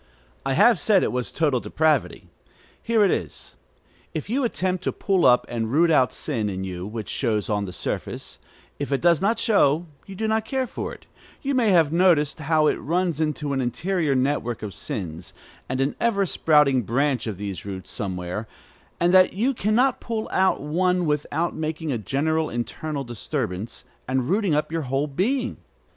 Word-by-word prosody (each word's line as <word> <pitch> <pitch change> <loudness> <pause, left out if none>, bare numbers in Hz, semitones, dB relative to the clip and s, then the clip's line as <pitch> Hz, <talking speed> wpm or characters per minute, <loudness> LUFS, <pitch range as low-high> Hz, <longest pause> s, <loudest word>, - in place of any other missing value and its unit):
I 135 - +1
have 230 - +5
said 200 -4 +4
it - - 0
was 125 -1 -2
total 145 -6 +1
depravity. 155 +1 0 0.5
Here 225 -2 +3
it 190 - +3
is. - - -4 0.6
If 155 +7 -4
you 270 +3 +1
attempt 185 -6 -1
to - - +1
pull 190 -6 +2
up 125 -1 +5
and 115 -1 -3
root 165 +4 +4
out 130 -7 +4
sin 115 -9 -2
in 95 -1 -4
you, 90 0 -5
which 110 0 -6
shows 110 -5 -1
on 105 -1 0
the 90 - -6
surface, - - -5 0.4
if 145 0 -3
it 135 - +2
does 170 -1 +3
not 220 +4 +2
show, 170 - +3 0.2
you 195 - -8
do 220 +3 -2
not 220 0 +1
care 260 +4 -1
for - - -5
it, - - -12 0.4
you 280 0 0
may 245 -4 +3
have 165 -5 +4
noticed 170 -4 +3
how 155 +1 +2
it - - +2
runs 170 0 -1
into 150 -2 -1
an 135 - 0
interior 150 +5 0
network 130 -4 -1
of 105 -3 -5
sins, 90 - -6 0.3
and 130 0 -2
an 135 +1 0
ever 205 -4 +2
sprouting 150 -6 +3
branch 125 +2 0
of 105 -4 -4
these 100 -4 -5
roots 95 -2 -7
somewhere; 95 +2 -4 0.5
and 175 +1 +3
that 185 0 +6
you 235 +8 +1
can 215 -2 0
not 255 +2 +2
pull 225 -2 -3
out 190 0 +2
one 180 +4 +1
without 150 +2 -1
making 155 0 -3
a 120 - -1
general 155 +8 0
internal 140 +5 -4
disturbance, 115 -4 -4 0.2
and 130 -1 0
rooting 195 -4 +2
up 150 +1 -1
your 165 0 -1
whole 135 +1 -1
being. 235 - -1
150 Hz, 185 wpm, -24 LUFS, 125-185 Hz, 0.6 s, that